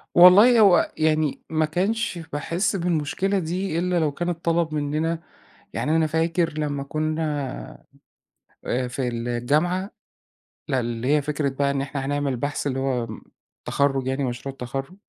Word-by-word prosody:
والله 205 +7 +8
هو 195 -4 +5
يعني، 155 -2 +1
ما 160 -1 +1
كانش 190 +5 -1 0.2
باحس 175 +8 -1
بالمشكلة 180 +3 0
دي 175 0 -2
إلّا 180 -1 +1
لو 155 -2 +1
كان 175 +4 -3
اتطلب 165 -1 0
مننا، 155 +3 -1 0.6
يعني 155 +2 +1
أنا 160 -1 +3
فاكر 165 0 0
لما 145 -2 -2
كنا، 150 - -3 0.8
آآ 125 +1 -1
في 125 0 -2
الجامعة، 140 - 0 0.8
لأ 135 -3 +1
اللي 120 0 -3
هي 150 - +2
فكرة 145 -1 -1
بقى 140 +1 0
إن 140 -1 -1
إحنا 135 -1 -4
هنعمل 140 -2 -1
بحث 145 +2 -2
اللي 135 -1 -1
هو 130 -3 0
امم، 110 -1 -8 0.4
تَخرُّج 135 -2 +1
يعني 135 +1 -1
مشروع 130 +2 -4
التَخرُّج. 135 +6 -6
150 Hz, 145 wpm, -24 LUFS, 135-170 Hz, 0.8 s, والله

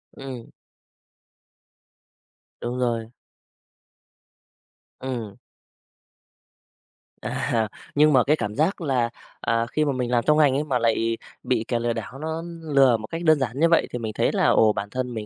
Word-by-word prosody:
Ừm. 130 -4 -8 2.1
Đúng 125 +1 -3
rồi. 115 -2 -1 1.9
Ừm. 120 -6 -5 1.8
À, 120 -1 -1 0.3
nhưng 150 +1 +5
mà 130 -2 +5
cái 150 - +3
cảm 105 -8 -4
giác 165 +6 +1
là, 130 -6 +1 0.3
à, 115 0 +1
khi 155 - +1
mà 145 - +1
mình 125 -2 -2
làm 120 -1 +2
trong 150 0 +5
ngành 145 -4 +4
ấy 145 - +1
mà 135 -5 0
lại 115 0 +1 0.3
bị 120 -3 0
kẻ 120 -2 0
lừa 120 0 0
đảo 120 +4 -7
nó 160 +2 -3 0.2
lừa 135 -6 +4
một 110 0 -8
cách 165 +6 -5
đơn 155 -3 +5
giản 130 0 -2
như 165 +2 +4
vậy 165 - +3
thì 125 - -4
mình 110 -2 -4
thấy - - +2
là, - - +1
ồ, 110 -1 +5
bản 100 0 -4
thân 125 +1 -3
mình 110 -2 -5
125 Hz, 160 wpm, -24 LUFS, 115-145 Hz, 2.1 s, nhưng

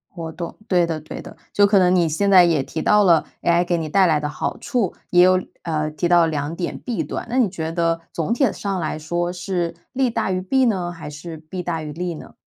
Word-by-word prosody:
我 165 -1 -5
懂。 170 0 -6
对 175 -2 +3
的， 160 -2 -3
对 155 - -8
的， - - -11 0.2
就 205 - +5
可 200 -1 +4
能 180 0 +4
你 170 -2 +3
现 200 +6 0
在 185 -2 +8
也 160 -5 +2
提 160 - -5
到 210 0 +4
了 170 -4 +4 0.2
，AI 170 +1 +3
给 175 -1 0
你 160 -2 -3
带 195 +3 +4
来 155 -3 +3
的 150 0 -3
好 - - -3
处。 230 -8 -1 0.2
也 175 0 +6
有， 185 0 +4 0.2
呃 155 -2 -1
提 170 +3 -1
到 175 -1 +5
2 155 0 -2
点 175 - -4
弊 240 -3 -3
端。 - - -5
那 250 - -1
你 220 -6 +3
觉 160 -3 -4
得， 165 -1 0
总 165 +7 -1
体 255 -3 +2
上 195 -2 -3
来 155 -1 -2
说 175 +3 -2
是， 175 -2 -2 0.2
利 260 -1 +1
大 195 - -1
于 185 0 -1
弊 260 +7 +2
呢？ 185 -6 0
还 165 -3 -8
是 160 +2 -8
弊 160 +4 -7
大 165 -2 -2
于 150 - -6
利 175 +3 -3
呢？ - - -11
175 Hz, 265 characters per minute, -21 LUFS, 160-185 Hz, 0.2 s, 在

